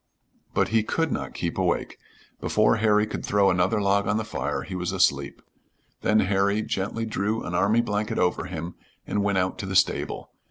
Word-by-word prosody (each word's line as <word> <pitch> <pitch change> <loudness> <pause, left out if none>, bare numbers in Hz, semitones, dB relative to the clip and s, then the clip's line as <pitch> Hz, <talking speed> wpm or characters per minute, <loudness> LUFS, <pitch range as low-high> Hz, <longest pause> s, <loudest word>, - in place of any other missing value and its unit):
But - - +2
he 110 0 +3
could 160 +8 -1
not - - -4
keep - - -3
awake. - - -1 0.4
Before 110 +1 +2
Harry 105 -1 +3
could 105 - -5
throw 100 -1 +3
another 90 +5 +2
log 100 0 +2
on 105 - +1
the 110 - -1
fire 105 - -3
he - - -8
was 90 -1 -2
asleep. 70 0 +1 0.6
Then 110 0 +3
Harry 100 +2 +1
gently 110 +4 -2
drew 110 +1 -1
an 90 - -5
army 100 +6 +3
blanket 105 -2 -2
over 90 - +1
him 85 +2 -5 0.3
and 105 - -1
went 100 -1 +1
out 90 0 0
to 95 - -4
the 95 - -4
stable. 95 - +1
100 Hz, 190 wpm, -25 LUFS, 95-110 Hz, 0.6 s, he